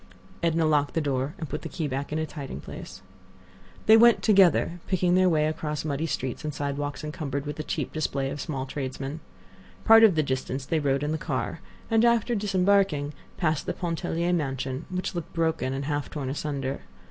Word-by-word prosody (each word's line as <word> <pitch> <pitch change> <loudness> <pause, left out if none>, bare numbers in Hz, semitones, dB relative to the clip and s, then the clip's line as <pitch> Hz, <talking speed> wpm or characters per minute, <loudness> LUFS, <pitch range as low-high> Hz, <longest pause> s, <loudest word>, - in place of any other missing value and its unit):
Edna 165 -1 +2
locked 145 -2 +2
the - - +3
door 140 +1 -1
and 160 - -5
put 150 - -4
the - - -6
key 160 -4 -3
back 140 +1 -3
in 155 - -1
its 160 0 -3
hiding 140 - -6
place. 95 +5 -9 0.8
They 220 - +8
went 235 0 +6
together, 190 -4 +4
picking 180 -2 +2
their 185 0 +5
way 155 -2 +2
across 155 0 -3
muddy 150 +2 -1
streets 130 -5 -3
and 155 - -2
sidewalks 145 0 -3
encumbered 145 -2 -4
with 150 0 -5
the 155 - -3
cheap - - -3
display 140 -3 -1
of 145 - -5
small 135 -3 -3
tradesmen. 135 +2 -5 0.7
Part 225 0 +8
of 210 -6 +7
the 155 - +3
distance 130 -1 -3
they 160 +3 0
rode 140 -1 +1
in 150 - -1
the 160 - -1
car, - - -3 0.3
and 225 0 +4
after 235 0 +3
disembarking, 195 -7 +2 0.2
passed 155 -4 0
the - - 0
Pontellier 170 0 -1
mansion, 135 -3 -2
which 185 0 -3
looked 170 -3 -5
broken 160 -6 0
and 135 +1 -3
half 145 0 -2
torn 140 -4 -4
asunder. 140 -2 -3
150 Hz, 195 wpm, -26 LUFS, 140-175 Hz, 0.8 s, They